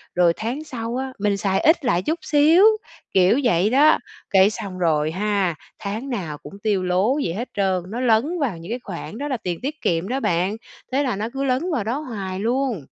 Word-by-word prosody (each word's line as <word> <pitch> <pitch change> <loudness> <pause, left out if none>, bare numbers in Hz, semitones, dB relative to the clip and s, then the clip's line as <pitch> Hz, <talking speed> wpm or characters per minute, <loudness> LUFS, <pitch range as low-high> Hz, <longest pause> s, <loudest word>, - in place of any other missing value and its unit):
rồi 175 -1 +4
tháng 245 +8 -3
sau 235 -5 -5
á, 265 0 -4
mình 200 -1 +1
xài 195 -1 0
ít 320 -3 +3
lại 180 -7 +2
chút 325 - -1
xíu, 315 +6 +5 0.5
kiểu 190 +8 +4
vậy 205 -3 +3
đó. 285 +5 +5 0.3
Cái 195 0 +5
xong 195 -3 -6
rồi 155 -2 +1
ha, 195 -2 0 0.2
tháng 220 +7 -4
nào 170 - -4
cũng 200 - -12
tiêu 200 -3 0
lố 185 +9 +2
vậy 165 - -2
hết 235 +6 -4
trơn, 190 -3 0
nó 235 +3 -4
lấn 255 +9 +2
vào 235 - -1
những 170 +6 -9
cái 245 - -2
khoản 195 +3 -7
đó 290 +2 -3
là 260 -4 -1
tiền 175 -5 -4
tiết 295 +3 -4
kiệm 170 +2 0
đó 260 +3 -1
bạn. 185 +1 0 0.3
Thế 280 +2 +2
là 250 -7 -1
nó 215 +3 -3
cứ 270 +1 -2
lấn 275 +7 0
vào 240 -9 0
đó 235 +6 -1
hoài 195 -9 -5
luôn. 240 - 0
215 Hz, 220 wpm, -22 LUFS, 185-265 Hz, 0.5 s, xíu